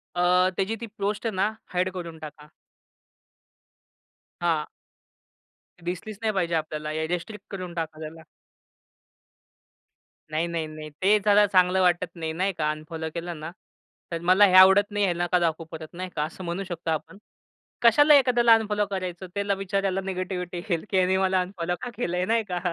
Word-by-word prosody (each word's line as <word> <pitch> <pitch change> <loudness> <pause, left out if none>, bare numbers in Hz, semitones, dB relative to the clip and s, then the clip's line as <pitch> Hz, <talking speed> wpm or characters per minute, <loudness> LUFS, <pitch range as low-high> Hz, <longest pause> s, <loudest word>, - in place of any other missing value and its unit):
अ, 180 +1 +4
त्याची 200 +4 0
ती - - -3
पोस्ट 205 +3 -2
ना 195 +3 +1 0.2
हाईड 180 +1 +1
करून 170 -3 -7
टाका. 150 -1 -10 1.9
हां. 165 -3 +1 1.2
दिसलीच 180 +4 -5
नाही 220 -1 0
पाहिजे 170 -3 0
आपल्याला. 155 -1 -3
या 160 0 -2
रिस्ट्रिक्ट 185 +4 -5
करून 185 -3 -6
टाका 160 -2 -4
त्याला. 160 +1 -8 2.1
नाही, 160 +2 0
नाही, 165 -2 -3
नाही. 155 0 -9
ते 205 +3 +5
जरा 205 0 +6
चांगलं 185 -1 +3
वाटत 180 -1 +2
नाही 160 -1 -4
नाही 190 +4 0
का. 150 -3 -1
अनफॉलो 160 +1 -6
केलं 170 -1 -5
ना, 160 +2 -6 0.6
तर 170 - -2
मला 200 +3 +7
हे 185 - +2
आवडत 190 +2 +7
नाही. 205 0 0
ह्यांना 175 -1 0
का 180 - +4
दाखवू 165 -1 -1
परत 160 -1 -7
नाही 185 +1 -5
का 150 - 0
असं 165 +4 -7
म्हणू 175 +3 -3
शकतो 170 -3 -4
आपण. 160 +4 -4 0.6
कशाला 290 +6 +7
एखाद्याला 240 -4 +5
अनफॉलो 210 -2 0
करायचं? 185 -1 -4
त्याला 200 0 0
बिच्याऱ्याला 195 0 -1
निगेटिव्हिटी 185 -1 -4
येईल 170 +2 -1
की 190 - +1
ह्यानी 185 +1 +3
मला 190 -1 +2
अनफॉलो 180 -2 -3
का 250 - -4
केलंय 180 -6 -1
नाही 225 +1 +1
का. 175 - -1
180 Hz, 165 wpm, -25 LUFS, 165-195 Hz, 2.1 s, मला